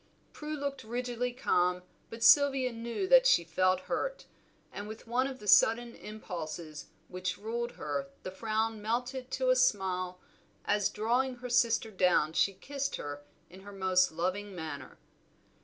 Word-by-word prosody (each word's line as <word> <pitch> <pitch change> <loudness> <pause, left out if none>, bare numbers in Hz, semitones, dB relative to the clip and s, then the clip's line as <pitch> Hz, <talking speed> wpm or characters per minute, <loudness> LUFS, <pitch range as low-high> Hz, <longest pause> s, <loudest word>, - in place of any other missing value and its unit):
Prue 305 0 -5
looked 280 -1 -4
rigidly 245 +1 -3
calm, 180 -7 +1 0.3
but 230 0 -6
Sylvia 270 -2 +5
knew 235 +11 -4
that - - +7
she 170 - +5
felt 185 +3 +1
hurt, - - -3 0.5
and 205 - -7
with 220 +1 -9
one 245 +3 +1
of 270 -1 -6
the 210 - -11
sudden 235 +4 +5
impulses 170 -7 -7 0.2
which 185 0 -4
ruled 235 +3 -4
her 140 -2 -4
the 185 - -5
frown 220 +2 -2
melted 245 +4 -2
to 260 -1 +1
a - - +4
smile, 185 -7 +1 0.5
as 205 -1 +2
drawing 245 +4 0
her 250 0 -8
sister 230 -2 +2
down 180 -5 +2
she 195 - +2
kissed 275 +6 -4
her 145 0 -6 0.2
in 185 - -14
her 200 +1 -11
most 185 -2 +2
loving 185 +4 -3
manner. 150 -5 -7
220 Hz, 155 wpm, -31 LUFS, 185-250 Hz, 0.5 s, that